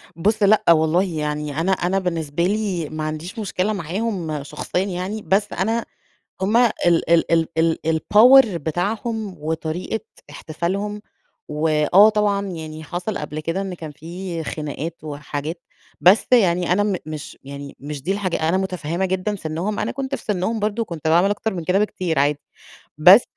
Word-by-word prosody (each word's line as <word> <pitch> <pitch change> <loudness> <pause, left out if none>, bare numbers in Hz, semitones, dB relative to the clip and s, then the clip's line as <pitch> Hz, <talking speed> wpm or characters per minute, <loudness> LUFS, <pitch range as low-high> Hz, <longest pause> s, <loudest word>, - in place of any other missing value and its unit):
بُص، 210 +6 +1
لأ 210 +2 +5
والله. 160 +3 +4
يعني 150 -4 -3
أنا 185 +4 +1
أنا 190 +1 +1
بالنسبة 170 -3 -2
لي، 190 -5 -1
ما 155 0 -4
عنديش 155 +7 -5
مشكلة 205 0 -1
معاهم 175 -4 -3
شخصيًا 180 +5 -2
يعني، 195 +3 -4
بس 205 +2 +1
أنا 225 +5 0 0.6
هم 210 +4 +2
ال 240 -2 +4 0.4
ال 170 0 +3
ال 165 -1 +3
ال 165 0 +2 0.2
الpower 245 +9 +7
بتاعهم، 200 +6 -2
وطريقة 160 +7 -3 0.3
احتفالهم. 190 +8 -3 0.5
وآه 155 +6 +4
طبعًا 205 -2 +1
يعني 160 -3 -7
حصل 180 +6 -4
قبل 150 +1 -5
كده، 165 +5 -2
إن 190 -2 -4
كان 160 -3 -8
في 170 +2 -6
خناقات، 155 +2 -5
وحاجات. 150 +2 -5 0.4
بس 190 +5 +5
يعني 180 -6 +4
أنا 205 +3 +3
م 205 -3 0
مش 155 -2 -7
يعني 140 0 -8
مش 145 0 -6
دي 185 +7 0
الحاجة 185 -5 -1
أنا 185 - +2
مُتفهّمة 180 -2 -2
جدًا 190 +3 -1
سِنُّهم، 175 +5 -3
أنا - - -1
كنت 270 +1 -3
في - - -6
سِنُّهم 210 +2 -1
برضه، 210 +2 -1
وكنت 165 -6 -4
باعمل 175 +5 +4
أكتر 205 +1 -2
من 170 -3 -4
كده 185 +3 +2
بكتير 185 -7 -1
عادي. 145 +1 +2 0.6
بس 185 +9 +9
180 Hz, 160 wpm, -21 LUFS, 155-205 Hz, 0.6 s, بس